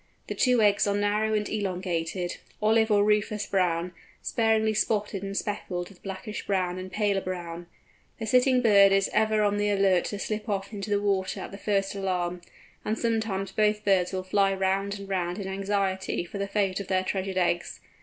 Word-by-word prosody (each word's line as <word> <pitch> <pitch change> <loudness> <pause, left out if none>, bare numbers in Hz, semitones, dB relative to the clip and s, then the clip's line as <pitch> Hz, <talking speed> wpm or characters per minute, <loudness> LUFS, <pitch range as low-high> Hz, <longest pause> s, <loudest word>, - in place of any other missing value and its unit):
The - - -4
two 250 -3 +3
eggs 205 0 +3
are 200 - +1
narrow 210 +1 +1
and 210 0 0
elongated, 180 -3 -2 0.2
olive 220 +1 +3
or 205 -1 +4
rufous 210 0 +1
brown, 180 -2 0 0.3
sparingly 220 -1 +2
spotted 210 -2 0
and 195 0 -4
speckled 180 -4 -3
with 195 -3 -18
blackish 195 +2 -6
brown 185 -2 0
and 185 0 -7
paler 200 -1 +1
brown. 175 -2 -6 0.5
The 225 - -4
sitting 250 +2 +3
bird 200 -3 +6
is 195 0 +2
ever 215 0 +3
on 205 0 +1
the 205 0 +1
alert 195 -3 +3
to 205 - -4
slip 215 +2 -4
off 200 +1 -2
into 205 0 -5
the 205 0 +2
water 195 -2 0
at - - -7
the 200 - -8
first 195 -1 0
alarm; 180 -3 -2 0.4
and 215 +1 -1
sometimes 220 -5 -1
both 210 0 +1
birds 190 -3 +3
will 185 -1 -3
fly 195 +1 +2
round 195 +1 0
and 200 - -8
round 180 -2 -2
in 200 -2 -5
anxiety 195 -2 -1
for 200 +3 -7
the 200 - -1
fate 195 -2 0
of 200 - -6
their 185 -1 +1
treasured 190 0 -2
eggs. 175 -1 0
200 Hz, 190 wpm, -27 LUFS, 185-210 Hz, 0.5 s, bird